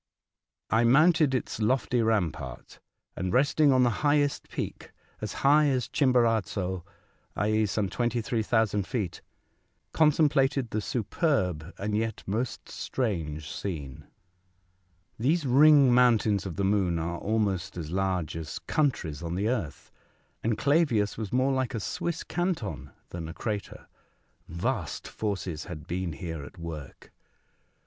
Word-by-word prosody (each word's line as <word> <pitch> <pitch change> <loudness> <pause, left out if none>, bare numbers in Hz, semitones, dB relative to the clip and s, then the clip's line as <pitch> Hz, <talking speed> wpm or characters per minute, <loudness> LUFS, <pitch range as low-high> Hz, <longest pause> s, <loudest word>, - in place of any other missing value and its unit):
I 115 +1 +4
mounted 150 +3 +5
its 125 - -3
lofty 125 +2 +1
rampart, 90 - -2 0.4
and 90 0 -2
resting 140 +3 +4
on 130 -1 +4
the 120 - +3
highest 145 -1 +1
peak, - - -6 0.3
as - - -3
high 150 +2 +6
as 130 -3 0
Chimborazo, 110 - +1 0.5
i.e., 110 +2 +1
some 100 0 -1
23,000 115 -3 0
feet, 105 -10 -3 0.7
contemplated 145 -5 +3
the 110 - -1
superb 95 - -1
and 105 +1 -2
yet 110 0 -2
most 115 +6 -3
strange 80 - -3
scene. 75 -9 -6 1.1
These 150 +7 +1
ring 140 0 +6
mountains 110 -5 +3
of 85 - -6
the 100 - -1
moon 95 -4 +2
are 85 +1 -3
almost 100 -5 -1
as 80 -2 -5
large 95 -4 -1
as 80 -1 -5
countries 120 - -1
on 85 0 -4
the 100 +4 0
earth, 100 - -3 0.5
and 115 -1 0
Clavius 140 -8 +2
was 110 -3 -5
more 130 +2 +2
like 130 -1 -1
a - - -1
Swiss 170 - -3
canton 175 - -3 0.2
than 85 -2 -6
a 80 - -8
crater. 105 -3 -4 0.6
Vast 90 - -3
forces 95 -7 -4
had 75 0 -8
been 90 -1 -3
here 80 -2 -6
at 80 - -12
work 80 -4 -8
110 Hz, 130 wpm, -28 LUFS, 90-130 Hz, 1.1 s, high